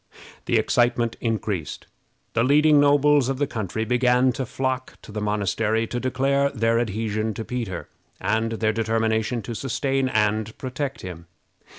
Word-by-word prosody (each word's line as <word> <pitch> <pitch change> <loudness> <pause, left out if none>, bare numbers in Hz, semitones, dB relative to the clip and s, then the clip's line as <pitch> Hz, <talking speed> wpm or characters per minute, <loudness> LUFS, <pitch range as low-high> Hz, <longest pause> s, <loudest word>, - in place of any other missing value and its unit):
The - - +2
excitement 120 -1 +2
increased. 105 -7 -2 0.5
The 115 - +2
leading 150 +3 +5
nobles 145 -1 +4
of 135 - -1
the 145 - +1
country 110 -3 -3
began 125 +2 +3
to 130 0 -4
flock 130 +1 -3
to - - -11
the 105 0 -4
monastery 105 +2 0
to 120 +2 -3
declare 135 +2 +1
their 115 -3 +1
adhesion 110 -1 -2
to 110 - -5
Peter, 115 -8 -4 0.3
and 115 +1 0
their 110 -1 0
determination 110 +1 0
to 120 - -5
sustain 135 +2 -1
and 110 -1 0
protect 135 +1 -4
him. 85 -2 -8
115 Hz, 150 wpm, -24 LUFS, 110-130 Hz, 0.5 s, leading